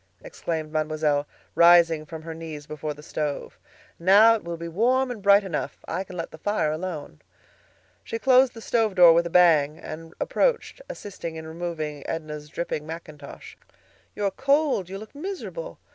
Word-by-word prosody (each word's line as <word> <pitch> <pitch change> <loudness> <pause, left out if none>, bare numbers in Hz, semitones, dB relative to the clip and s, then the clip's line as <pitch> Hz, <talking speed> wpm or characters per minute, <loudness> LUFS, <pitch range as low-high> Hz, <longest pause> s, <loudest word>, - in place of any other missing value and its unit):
exclaimed 160 -2 -4
Mademoiselle, 155 -2 0 0.3
rising 170 -2 +5
from 160 0 -8
her 165 0 -6
knees 160 -2 -8
before 150 0 -5
the 150 - -13
stove. 150 -2 -4 0.4
"Now 200 +6 +7
it 225 - -3
will 170 0 -5
be 170 +1 -6
warm 250 +9 +1
and 225 -4 -7
bright 200 +1 +6
enough; 180 -6 -4
I 190 - -2
can 185 -1 -10
let 165 - -5
the 160 - -12
fire 205 -5 0
alone." 155 - -6 0.8
She 225 - -4
closed 255 +1 +4
the 225 - -9
stove 220 -3 0
door 175 -2 +8
with 170 +1 +2
a - - -6
bang, 160 -4 +4
and 165 +1 -9
approaching, - - 0
assisted 195 - -7
in 160 0 -7
removing 160 -3 -5
Edna's 150 -2 -5
dripping 155 -2 -4
mackintosh. 155 -3 -10 0.6
"You 205 - -2
are 200 - +1
cold; 275 - +1
you 195 - -5
look 215 +5 -11
miserable. 395 +10 -6
170 Hz, 170 wpm, -25 LUFS, 155-205 Hz, 0.8 s, door